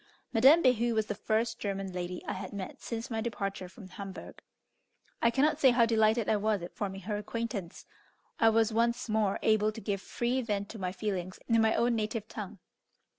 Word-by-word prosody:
Madame 270 +9 +7
Behu 240 -2 +3
was 220 -1 +2
the 210 - -3
first 225 +3 -1
German 195 -2 -3
lady 180 0 -5
I - - -2
had 190 +1 -6
met 195 -2 -6
since 235 +2 -5
my 225 -1 -1
departure 195 -5 -3
from 195 +1 -12
Hamburgh. 190 0 -9 0.8
I 235 - +5
cannot 285 +5 +2
say 270 - +6
how 240 -1 +5
delighted 220 0 +3
I 215 - +3
was 210 -3 0
at 175 - -8
forming 195 -2 -4
her 210 +2 -3
acquaintance. 210 -3 -5 0.5
I 225 - +6
was 225 0 +2
once 235 +2 +1
more 215 -3 +1
able 215 -1 +3
to 220 - -8
give 200 -3 -2
free 245 +5 -1
vent 205 -4 -2
to 225 - -8
my 180 -1 -2
feelings 185 -1 -3
in 230 -1 +4
my 220 0 +3
own 235 +1 +2
native 215 0 -2
tongue. 210 -2 -7
215 Hz, 195 wpm, -30 LUFS, 195-230 Hz, 0.8 s, Madame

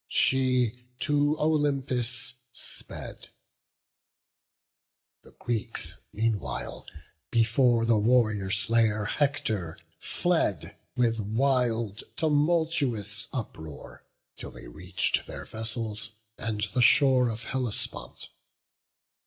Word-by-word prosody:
She 125 -3 +2 0.2
to 145 +1 +2
Olympus 135 -6 0 0.2
sped; 120 - -5 1.9
the - - -17
Greeks 115 -3 -3
meanwhile 110 -1 -2 0.4
Before 115 0 +4
the 115 -2 +4
warrior 110 -4 +3
slayer 105 +1 +2
Hector 110 - 0 0.2
fled 165 - 0 0.2
With 115 -2 +2
wild, 115 -1 +1
tumultuous 145 - +1
uproar, 80 - -7 0.3
till - - -6
they - - -9
reach'd - - -1
Their - - -6
vessels 110 0 -4 0.2
and 110 -2 -3
the 125 - +3
shore 130 0 +5
of 115 +1 -4
Hellespont. 115 - -3
115 Hz, 85 wpm, -28 LUFS, 110-135 Hz, 1.9 s, shore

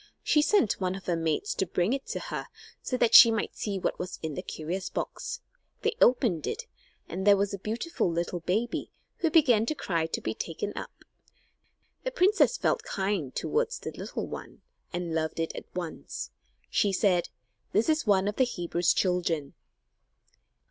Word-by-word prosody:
She 300 - +4
sent 295 - +2
one 185 0 0
of 195 - -9
her 175 - +1
maids 165 +4 -1
to 190 - -1
bring 180 +6 +1
it 270 0 -3
to - - -3
her - - -5 0.3
so 255 - -2
that 240 -2 +2
she 230 - +11
might 225 -2 -1
see 200 -2 -2
what 185 - -2
was 180 +1 -4
in 160 -1 -2
the - - -4
curious 175 +5 -4
box. - - -4 0.4
They 450 +1 +1
opened 230 - +4
it, - - -3 0.4
and 185 +3 -4
there 200 -1 +8
was 200 0 0
a 200 - -4
beautiful 225 - -1
little 170 +1 -2
baby, 205 +8 -1 0.3
who 330 - +1
began 250 -9 +4
to 310 - 0
cry 165 - -1
to - - -3
be 110 - -3
taken 165 - -4
up. - - -8 1.0
The - - 0
princess 425 +2 +3
felt 485 - +1
kind 190 - -2
toward 465 +1 0
the - - -5
little - - -5
one, - - -9 0.3
and 175 -2 -3
loved 160 0 -1
it 165 - -2
at - - -6
once. 175 -3 -5 0.4
She 205 - +3
said: 185 -2 +2 0.4
"This 215 +3 +2
is 310 -6 +1
one 195 -1 +4
of 205 - -2
the 260 - +5
Hebrews' 175 -6 0
children." 170 -6 0
195 Hz, 180 wpm, -28 LUFS, 170-240 Hz, 1.0 s, she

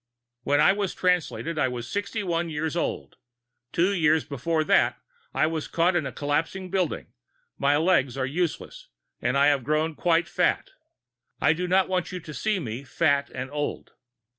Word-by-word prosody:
_ - - -2
_When 145 - +4
I - - +6
was 200 -2 -2
Translated, 170 -3 0
I 135 - +3
was 120 -2 -5
sixty 205 - -3
one 170 -2 -1
years 160 +1 -2
old. 170 - -3 0.5
Two 180 +4 +2
years 160 -3 +3
before 155 +4 -1
that, - - +3 0.3
I - - +2
was 160 -1 -2
caught 175 +2 +2
in 160 -5 +1
a - - -5
collapsing 165 +6 -2
building; 185 -4 -2 0.5
my 140 +1 +3
legs 150 -6 +2
are 130 - 0
useless, 180 - -3 0.3
and - - +1
I 140 +1 +5
had 140 -3 +1
grown 155 +4 0
quite 170 +1 +2
fat. - - 0 0.7
I - - +4
do 180 +2 -3
not 185 +1 +3
want 185 -1 -1
you 180 - -4
to 155 -2 -10
see 215 +6 0
me 125 -6 -5
fat 140 0 +1
and 130 +1 -6
old. 145 0 -4
160 Hz, 180 wpm, -26 LUFS, 145-180 Hz, 0.7 s, I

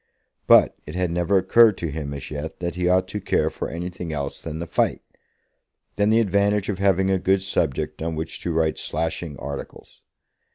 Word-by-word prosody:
But - - +6
it 75 - -7
had 90 -2 0
never 90 +3 +2
occurred 105 +2 +5
to 85 -3 -3
him 75 -1 -5
as 70 - -7
yet 75 +1 -6
that 85 -1 -3
he 90 0 0
ought 95 0 +3
to 105 +1 -4
care - - +1
for - - -5
anything 90 0 -5
else 70 -2 -4
than 80 -1 -6
the 85 - -4
fight, - - 0 0.9
than 105 0 +2
the 110 +1 +4
advantage 100 -1 +1
of 95 -2 -2
having 95 -1 +2
a 95 - +2
good 95 +1 +2
subject 75 -5 -1
on 80 0 -2
which 80 +1 -5
to 85 - -2
write 80 -1 0
slashing 80 -2 -3
articles. 70 0 -8
90 Hz, 195 wpm, -23 LUFS, 80-95 Hz, 0.9 s, But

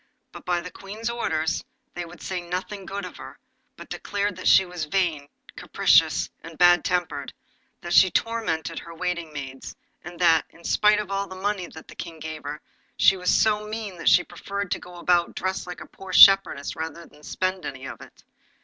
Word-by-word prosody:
But - - -12
by 175 -1 0
the 180 +1 -8
Queen's 215 +4 -5
orders 160 -9 -1 0.3
they 175 0 -5
would 175 +1 -13
say 185 -2 -3
nothing 185 +3 -5
good 200 -1 -4
of 180 - -10
her, - - -10 0.4
but - - -11
declared 205 -1 -2
that 185 - -3
she 190 - +7
was 175 -3 -5
vain, 155 -4 -1 0.3
capricious, - - +3
and 165 -1 -11
bad 175 -1 +6
tempered; 180 -1 -2 0.5
that 175 -2 -4
she 190 - +7
tormented 175 -6 -1
her 170 0 -11
waiting 175 -2 -3
maids, 135 -3 -8 0.3
and 175 +1 -9
that, 165 -3 +4
in 170 - -19
spite 210 +4 +4
of 205 -2 -5
all 195 0 -1
the 190 - -9
money 190 -1 -2
that 160 - -13
the - - -12
King 165 -1 -8
gave 155 0 -7
her, 145 +1 -6 0.4
she 195 - +6
was 180 -1 -2
so 210 -1 +2
mean 210 -4 -6
that - - +3
she 180 +2 +6
preferred 200 +2 -6
to - - 0
go 180 - -12
about 175 0 +1
dressed 190 0 -3
like 180 - -7
a - - -8
poor 190 -1 -11
shepherdess, 195 -7 +7
rather 160 +1 -6
than 150 - -20
spend 185 +4 -2
any 130 0 -6
of - - -8
it. - - -15
180 Hz, 200 wpm, -25 LUFS, 165-195 Hz, 0.5 s, she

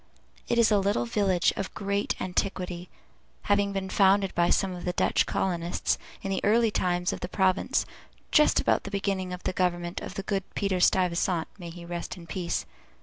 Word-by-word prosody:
It 235 - +1
is 230 -1 +5
a 205 - +5
little 195 -11 +1
village 185 - +2
of 195 - -4
great 200 0 -1
antiquity, 180 -1 -3 0.5
having 205 0 +2
been 195 -1 -3
founded 195 0 +3
by 175 0 +2
some 195 - +2
of 175 - -7
the 180 - -1
Dutch - - +2
colonists, 175 -2 -1 0.2
in 195 - -2
the 190 - -1
early 225 +2 +4
times 180 -2 0
of - - -5
the 180 - -5
province, 190 0 +1 0.5
just 300 - +5
about - - +2
the - - -6
beginning 195 -2 -2
of 180 0 -6
the - - -1
government 175 -1 -1
of - - -7
the 195 - -4
good 195 -1 -1
Peter 195 -2 0
Stuyvesant 180 -2 +2
(may 175 -2 -7
he 170 +1 -10
rest 175 +2 -5
in 170 - -11
peace!) 170 +1 -3
185 Hz, 190 wpm, -27 LUFS, 175-200 Hz, 0.5 s, is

